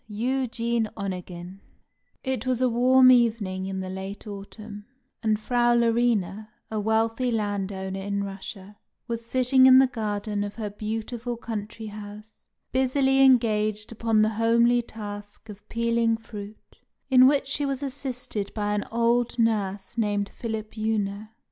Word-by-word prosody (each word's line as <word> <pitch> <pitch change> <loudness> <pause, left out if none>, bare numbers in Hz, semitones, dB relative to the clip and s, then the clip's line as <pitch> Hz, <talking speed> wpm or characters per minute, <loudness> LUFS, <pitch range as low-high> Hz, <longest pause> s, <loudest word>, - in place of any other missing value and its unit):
EUGENE 235 0 -1
ONEGIN 185 -1 -6 0.6
It 260 -2 -2
was 255 -2 +1
a 255 - +3
warm 255 +2 +6
evening 215 -6 +2
in 190 0 -3
the 185 - -5
late 190 +3 -7
autumn, 205 +1 -9 0.3
and 215 -2 +1
Frau 240 +1 +2
Larina, 230 -3 +1 0.2
a 215 - -1
wealthy 225 +3 +1
landowner 195 -3 -2
in 200 +1 -2
Russia, 195 +1 -8 0.3
was 235 -1 -3
sitting 260 +2 +4
in 260 0 +9
the 265 - +7
garden 210 -4 -2
of 205 0 -6
her 215 -3 -4
beautiful 225 +3 -4
country 220 -1 -6
house, 210 +1 -10 0.2
busily 265 +1 +2
engaged 215 -4 +3
upon 225 -1 +2
the 215 - +3
homely 235 +2 +3
task 205 -1 -9
of 205 0 -12
peeling 230 0 +1
fruit, 215 -2 -11 0.3
in 255 0 +8
which 280 0 +3
she 285 +2 -2
was 275 0 -2
assisted 255 -6 -4
by 205 -1 -1
an 210 - 0
old 235 +1 +1
nurse 210 -2 0
named 205 -2 0
Philipjewna. 215 -2 -3
220 Hz, 135 wpm, -26 LUFS, 205-240 Hz, 0.6 s, in